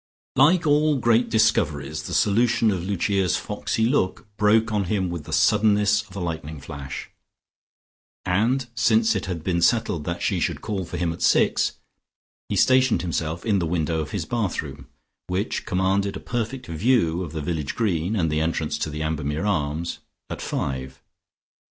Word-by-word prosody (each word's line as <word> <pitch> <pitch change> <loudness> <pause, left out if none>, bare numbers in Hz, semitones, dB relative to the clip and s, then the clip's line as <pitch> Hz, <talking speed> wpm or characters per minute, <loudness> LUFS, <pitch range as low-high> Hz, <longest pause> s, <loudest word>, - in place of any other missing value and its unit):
Like 170 +3 +4
all 150 0 +3
great 115 0 +2
discoveries, 80 - +1
the - - -5
solution 115 +1 +3
of 90 -3 -2
Lucia's 95 -1 0
foxy 110 - -2
look 115 -7 0
broke 110 +2 +3
on 105 -2 0
him 95 -2 -1
with 85 -4 -5
the - - -9
suddenness 105 -1 +3
of 95 - -14
a - - -4
lightning 80 -3 -4
flash, 70 0 -7 1.1
and 115 +8 +1
since 110 +1 +3
it 95 - -3
had 85 -4 -4
been 85 -1 0
settled 90 -6 +1
that 85 0 -3
she - - +1
should - - -1
call 100 -4 -3
for - - -6
him 85 -1 -1
at 85 - -11
six, - - +3 0.8
he - - -1
stationed 130 -4 +4
himself 85 -1 -3
in 105 -4 +2
the 85 - -1
window 80 -1 0
of 75 - -5
his 95 -6 -3
bathroom, 75 - -3 0.4
which 95 +4 -2
commanded 95 +1 0
a - - -8
perfect 120 +2 -4
view 85 0 +1
of 85 -5 -5
the 80 - -4
village 75 -3 -3
green 95 -3 0
and 80 -6 +1
the 75 0 +1
entrance 80 -1 -1
to - - -2
the 75 +1 -4
Ambermere 75 +2 -2
Arms 80 -3 -1 0.3
at - - -5
five. 65 -1 -4
95 Hz, 170 wpm, -24 LUFS, 80-110 Hz, 1.1 s, Like